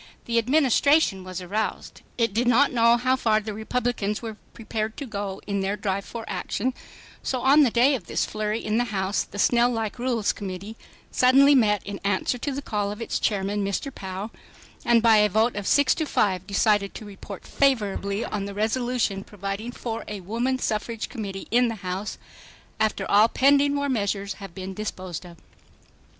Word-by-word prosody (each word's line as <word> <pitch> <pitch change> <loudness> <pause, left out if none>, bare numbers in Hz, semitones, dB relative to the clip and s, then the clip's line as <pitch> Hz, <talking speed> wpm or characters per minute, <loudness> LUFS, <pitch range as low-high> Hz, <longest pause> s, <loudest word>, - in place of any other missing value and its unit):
The 235 0 +2
Administration 275 -3 +3
was 185 0 -6
aroused. 210 +4 -3 0.2
It 230 -4 +1
did 235 +3 +1
not 255 +4 +4
know 235 0 +5
how 255 +2 +2
far 220 -4 +2
the 215 0 -6
Republicans 220 -1 -2
were 225 -2 -6 0.2
prepared 220 -1 -4
to 285 - -5
go 200 -4 -5
in 200 -1 -1
their 195 +2 -1
drive 200 -1 -2
for 230 -1 -7
action, 205 +6 -2 0.5
so 255 -2 -2
on 280 +3 +6
the 275 - +5
day 245 +5 +4
of 220 -10 -4
this - - 0
flurry 215 +1 -3
in 215 +2 +1
the 245 - +1
House 195 -3 -1
the - - -8
snail 240 +3 +4
like 225 -1 -3
Rules 240 -4 0
Committee 195 +2 -7 0.4
suddenly 270 +3 +6
met 210 -6 +3
in 200 -1 -6
answer 200 +5 0
to 285 - -2
the 275 +1 -4
call 205 -3 -2
of 210 - -7
its 230 - -2
chairman, 205 0 0
Mr. 200 +8 -3
Pou, 190 +3 -6 0.5
and 235 -1 +4
by 225 -2 +6
a 210 0 +4
vote 220 +4 +2
of 205 -2 -4
6 285 -2 +4
to 315 -2 -2
5 190 -7 0
decided 205 -1 +1
to 220 - -8
report 200 -1 -10
favorably 210 -6 0
on 200 -1 -3
the 200 0 -7
resolution 225 -2 0
providing 200 +3 -5
for 230 -2 -5
a 210 -2 -6
Woman 235 +7 -1
Suffrage 225 -1 -3
Committee 200 -6 -6
in 245 +2 +4
the 230 - -3
House 185 +3 -3 0.6
"after 215 -3 0
all 210 +2 +6
pending 280 +3 +3
war 285 0 0
measures 200 -5 -1
have 195 -4 -9
been 190 0 -6
disposed 185 -4 -5
of." 170 -1 -14
215 Hz, 185 wpm, -25 LUFS, 200-245 Hz, 0.6 s, on